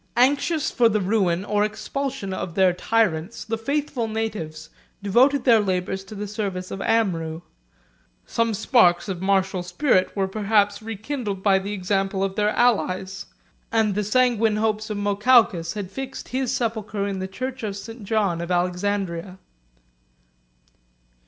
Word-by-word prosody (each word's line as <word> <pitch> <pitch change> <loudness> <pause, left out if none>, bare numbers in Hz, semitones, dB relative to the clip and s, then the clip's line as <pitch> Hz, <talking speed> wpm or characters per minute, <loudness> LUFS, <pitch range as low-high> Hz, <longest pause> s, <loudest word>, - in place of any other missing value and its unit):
Anxious 285 +5 +2
for 235 -2 +4
the 215 -1 +1
ruin 190 -2 +1
or 205 0 +1
expulsion 215 -1 -3
of 175 -2 -5
their 190 -2 +4
tyrants, 190 -1 0
the 225 - -2
faithful 275 0 -2
natives 205 -9 -4 0.3
devoted 255 +7 +4
their 235 -4 +6
labors 190 -1 -1
to 210 - -10
the 205 +1 -4
service 195 -3 -4
of 195 - -5
Amrou: 175 -8 0 0.8
some 230 -1 0
sparks 185 -7 +3
of 185 -3 -4
martial 190 -1 +1
spirit 185 +1 +1
were 195 -1 0
perhaps 205 0 +1
rekindled 220 -2 -4
by 195 -2 +4
the 200 +2 -5
example 195 0 -1
of 195 -1 -2
their 210 0 +2
allies; 190 -5 0 0.4
and 220 -2 +2
the 210 +2 -1
sanguine 225 0 +2
hopes 215 0 -1
of 210 - -3
Mokawkas 205 -4 +3
had 200 -3 -5
fixed 270 +3 -7
his 255 0 -1
sepulchre 220 -4 -2
in 195 -1 -3
the 190 - -3
church 255 +6 -5
of 205 -3 -4
St. 225 +2 -9
John 200 -5 0
of 170 - -5
Alexandria. 180 0 -1
205 Hz, 145 wpm, -23 LUFS, 190-225 Hz, 0.8 s, their